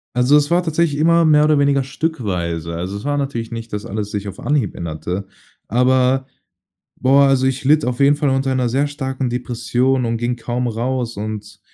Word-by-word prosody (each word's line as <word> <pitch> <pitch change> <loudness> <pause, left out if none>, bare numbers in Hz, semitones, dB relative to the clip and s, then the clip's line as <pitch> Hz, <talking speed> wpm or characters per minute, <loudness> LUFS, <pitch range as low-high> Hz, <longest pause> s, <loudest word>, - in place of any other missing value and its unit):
Also, 125 +4 +4
es 145 0 +1
war 175 +1 +2
tatsächlich 160 -3 0
immer 170 +1 +4
mehr 150 -1 +5
oder 150 -1 +3
weniger 140 -1 +2
stückweise. 95 - -3
Also, 90 +4 -4
es 100 - -9
war 145 0 0
natürlich 130 -5 -3
nicht, 115 -1 -7
dass 105 - -4
alles 105 0 -4
sich 105 -1 -4
auf 100 - -8
Anhieb 140 -9 0
änderte, 85 +4 -5 0.4
aber 130 +2 +2 0.7
boah, 135 +2 +5
also 135 -1 +3
ich 135 +1 -1
litt 150 +2 +4
auf 125 0 -2
jeden 140 +1 +5
Fall 145 -2 0
unter 135 0 0
'ner 125 -2 +1
sehr 135 +5 +1
starken 135 -2 -3
Depression 125 +1 0
und 115 0 -1
ging 120 +1 -1
kaum 120 +1 -3
raus. 120 +1 -2
Und 105 0 -6
125 Hz, 195 wpm, -19 LUFS, 110-140 Hz, 0.7 s, mehr